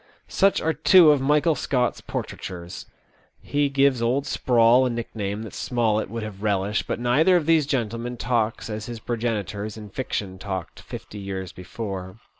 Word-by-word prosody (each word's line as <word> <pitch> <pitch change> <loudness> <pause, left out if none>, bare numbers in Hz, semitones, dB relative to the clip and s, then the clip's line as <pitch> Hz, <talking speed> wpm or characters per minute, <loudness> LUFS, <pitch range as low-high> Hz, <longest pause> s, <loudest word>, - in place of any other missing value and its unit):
Such 195 0 +3
are 160 - +1
two 175 -3 +7
of 145 -2 +2
Michael 150 +4 +3
Scott's 125 -4 -1
portraitures. 85 -1 -6 0.5
He 145 0 0
gives 135 -2 +3
Old 130 +4 +1
Sprawl 120 +1 +4
a 130 - +1
nickname 110 -3 -4
that 110 - -9
Smollett 110 -4 0
would 115 +1 -4
have 105 -2 -8
relished, 100 0 0
but - - -2
neither 140 +10 +4
of 170 -4 +2
these 160 -3 +3
gentlemen 120 -2 -2
talks 115 -2 -1
as 105 -1 -5
his 120 -1 -6
progenitors 110 -3 -3
in 105 -1 -9
fiction 95 -4 -4
talked 95 -3 -5
fifty 105 - -9
years 95 -2 -5
before. 95 0 -6
115 Hz, 160 wpm, -24 LUFS, 105-130 Hz, 0.5 s, two